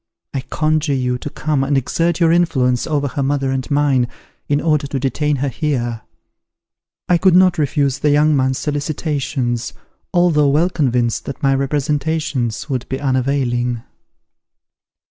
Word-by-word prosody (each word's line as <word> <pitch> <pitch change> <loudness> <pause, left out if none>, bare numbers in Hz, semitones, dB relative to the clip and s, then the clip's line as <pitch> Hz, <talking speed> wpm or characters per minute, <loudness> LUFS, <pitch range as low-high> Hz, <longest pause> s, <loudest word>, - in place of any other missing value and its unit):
I 135 - -2
conjure 155 +1 0
you 125 -1 -1
to 145 - -5
come 150 -2 -1
and 140 0 +1
exert 165 +6 0
your 165 -2 +4
influence 130 -8 +2
over 145 -3 0
her 140 +1 -3
mother 135 -1 0
and 130 -1 -3
mine, 140 -4 +2 0.4
in 145 0 +2
order 150 -3 +1
to 135 -1 -3
detain 145 +3 0
her 140 +1 -1
here." 120 -5 -2 1.1
I 175 -1 +3
could 185 -1 +4
not 185 -1 +4
refuse 145 -2 0
the 150 - +2
young 150 +1 +4
man's 130 -1 +1
solicitations, 145 -5 -2 0.4
although 170 -5 +3
well 160 +6 +2
convinced 125 -7 0
that 140 - -7
my 135 0 +4
representations 145 -2 -1
would 130 -4 -3
be 135 - -3
unavailing. 125 -3 0
140 Hz, 145 wpm, -18 LUFS, 130-155 Hz, 1.1 s, your